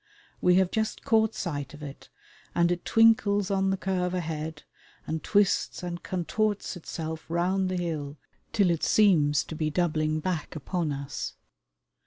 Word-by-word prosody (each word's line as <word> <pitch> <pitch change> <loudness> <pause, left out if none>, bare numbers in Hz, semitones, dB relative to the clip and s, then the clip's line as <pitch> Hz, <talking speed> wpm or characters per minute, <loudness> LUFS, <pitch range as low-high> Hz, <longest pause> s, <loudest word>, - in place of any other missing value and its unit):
We 180 0 +5
have 185 -1 +3
just 220 -1 -2
caught 220 -1 +3
sight 145 -5 -4
of 150 - -11
it, 140 -2 -9 0.5
and 170 0 +3
it 175 0 -2
twinkles 205 -3 +4
on 195 0 +2
the 195 - +1
curve 185 -1 -1
ahead 160 -3 -4 0.4
and 160 0 -3
twists 205 -3 +2
and 175 -1 -4
contorts 205 +4 -1
itself 160 -2 -6
round 185 +3 +1
the 185 - -1
hill 155 -4 -3 0.3
till 195 -5 +3
it 165 - -1
seems 155 -9 +4
to 160 - -8
be 155 0 -1
doubling 155 -2 0
back 165 -1 -3
upon 160 +1 -2
us. 140 0 -5
175 Hz, 155 wpm, -27 LUFS, 155-190 Hz, 0.5 s, We